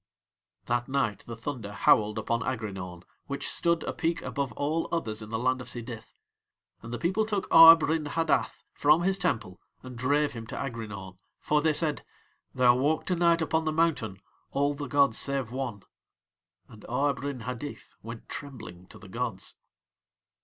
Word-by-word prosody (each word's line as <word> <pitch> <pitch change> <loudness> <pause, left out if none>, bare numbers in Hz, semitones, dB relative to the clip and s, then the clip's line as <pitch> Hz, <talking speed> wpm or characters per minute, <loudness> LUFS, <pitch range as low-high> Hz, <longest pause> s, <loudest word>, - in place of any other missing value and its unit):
That 120 0 0
night 130 -7 0
the 115 - -6
thunder 115 -3 -5
howled 105 0 +3
upon 115 0 -1
Aghrinaun, 95 -7 -4 0.2
which 140 0 -3
stood 170 -2 +1
a - - -3
peak 165 0 -1
above 140 -4 -3
all 155 +5 -1
others 110 -10 -2
in 105 - -9
the 110 - -2
land 130 +2 0
of 125 - -9
Sidith. 115 -2 -7 0.6
And 115 - -9
the 120 - -3
people 190 - +1
took 210 -3 -2
Arb 165 0 +9
Rin 160 -1 0
Hadith 165 +1 0
from 150 +4 +4
his 195 +1 +1
Temple 105 - -2 0.2
and 130 -1 -9
drave 145 +4 +1
him 115 -2 -7
to - - -7
Aghrinaun, 105 -7 -6 0.2
for 150 0 +1
they 155 0 +2
said: 150 -1 0 0.5
"There 125 -1 +5
walk 145 +5 +1
to 180 - +1
night 170 -1 +3
upon 160 0 0
the 155 - +1
mountain 155 - 0 0.3
All 140 +1 +1
the 145 -1 -6
gods 140 -2 +3
save 135 -4 -1
One." 120 -6 -4 0.8
And 110 - -14
Arb 140 +2 +1
Rin 140 -2 -4
Hadith 125 +5 -7
went 115 +1 -9
trembling 110 -10 -8
to - - -13
the 95 - -13
gods. 115 -2 -4
130 Hz, 170 wpm, -28 LUFS, 115-150 Hz, 0.8 s, Arb